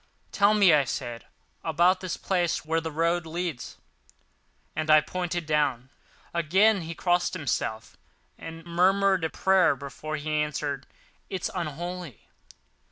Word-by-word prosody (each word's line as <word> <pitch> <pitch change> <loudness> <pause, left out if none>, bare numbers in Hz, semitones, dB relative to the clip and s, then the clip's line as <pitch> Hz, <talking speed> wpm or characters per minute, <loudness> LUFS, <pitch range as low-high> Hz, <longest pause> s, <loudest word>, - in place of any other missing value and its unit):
"Tell 205 +1 +4
me," 195 -5 +6
I 145 -2 +5
said, 120 -2 -5 0.4
"about 175 +3 +3
this 185 -2 -4
place 175 -4 -1
where 165 +1 0
the 160 - -4
road 165 +2 0
leads," 165 -5 -4 1.0
and 155 0 -2
I 155 0 +8
pointed 175 +1 -3
down. 145 -5 0 0.4
Again 190 +5 +3
he 165 0 -6
crossed 175 +1 +1
himself 115 -8 -3 0.4
and 165 0 -9
mumbled 190 +2 +3
a 160 - 0
prayer, 190 +1 +3
before 150 +2 -6
he 155 +1 -4
answered, 150 -2 -2 0.4
"It 190 -2 -4
is - - -1
unholy." 175 - -5
165 Hz, 135 wpm, -27 LUFS, 150-180 Hz, 1.0 s, I